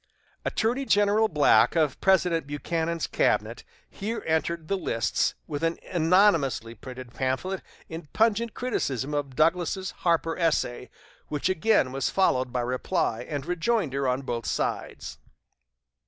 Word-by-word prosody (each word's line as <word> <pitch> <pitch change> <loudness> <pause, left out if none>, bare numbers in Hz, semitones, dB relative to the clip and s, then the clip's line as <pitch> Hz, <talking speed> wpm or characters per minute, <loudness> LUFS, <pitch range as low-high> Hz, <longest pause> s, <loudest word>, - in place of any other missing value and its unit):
Attorney 240 +5 0
General 205 -2 +3
Black 150 -3 +4
of 155 -5 +1
President 180 -5 +2
Buchanan's 165 +3 -2
cabinet - - 0 0.2
here 220 +3 -5
entered 160 0 -1
the 195 - 0
lists 115 - 0
with 145 -2 -5
an 165 0 +1
anonymously 165 - +3
printed 125 +1 -10
pamphlet 135 +10 -2 0.3
in 165 -1 -8
pungent 225 +1 +1
criticism 145 - -2
of 140 -3 -3
Douglas's 175 +5 +1
"Harper" 165 -2 +1
essay; 150 -7 0 0.4
which 150 +4 -1
again 185 -7 +2
was 135 0 -1
followed 130 -10 +1
by 125 0 -1
reply 125 0 -1
and 145 -2 -3
rejoinder 170 - 0
on 130 +2 0
both 120 -3 -4
sides. - - -3
165 Hz, 125 wpm, -26 LUFS, 135-190 Hz, 0.4 s, Black